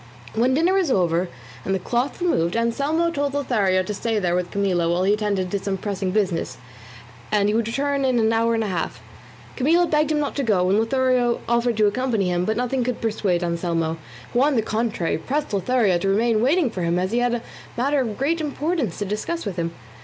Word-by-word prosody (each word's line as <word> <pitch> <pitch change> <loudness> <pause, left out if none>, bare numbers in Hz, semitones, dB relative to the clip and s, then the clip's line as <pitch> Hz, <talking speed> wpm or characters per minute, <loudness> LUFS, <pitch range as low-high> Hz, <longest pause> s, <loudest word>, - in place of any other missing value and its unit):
When 245 +4 +2
dinner 335 +5 +3
was 380 -5 +2
over 175 -5 +1 0.3
and 190 - 0
the - - -1
cloth 245 +8 -1
removed, 175 - +1
Anselmo 285 +9 +1
told 285 -2 -2
Lothario 200 -9 +1
to 210 - -4
stay 225 +2 -1
there 180 -4 0
with 180 0 -1
Camilla 185 -4 0
while 175 +2 +1
he 200 +2 +3
attended 200 -4 -1
to 200 - 0
some 195 0 -2
pressing 195 -1 -3
business, 185 -3 -1 0.7
as 210 -2 +3
he 210 - +2
would 225 0 +1
return 280 +3 -1
in 255 -2 +2
an 225 -1 +2
hour 230 +1 +2
and 225 - 0
a - - -2
half. 180 -4 -3 0.6
Camilla 330 +7 +3
begged 305 -2 +1
him 300 - +1
not 290 - -2
to - - +1
go, 195 -6 +2
and 205 - +3
Lothario 250 0 +1
offered 235 -1 +1
to 215 - +4
accompany 210 -3 0
him, 175 0 0
but 220 +2 -1
nothing 250 +1 0
could 250 -1 -2
persuade 200 -6 0
Anselmo, 170 -1 -1 0.4
who 245 - +3
on 285 0 +3
the 225 - +2
contrary 215 -7 -1
pressed 285 - -2
Lothario 200 -2 +2
to 195 - 0
remain 220 +2 +2
waiting 280 +1 +2
for 185 - -5
him 170 0 +1
as 185 +2 -1
he 235 - +1
had 245 0 +1
a 235 - -5 0.3
matter 275 +3 +2
of 225 -5 -3
great 315 +5 0
importance 295 - -2
to 205 - -2
discuss 215 - -3
with 195 -3 -4
him. 170 -1 -1
225 Hz, 220 wpm, -23 LUFS, 190-260 Hz, 0.7 s, to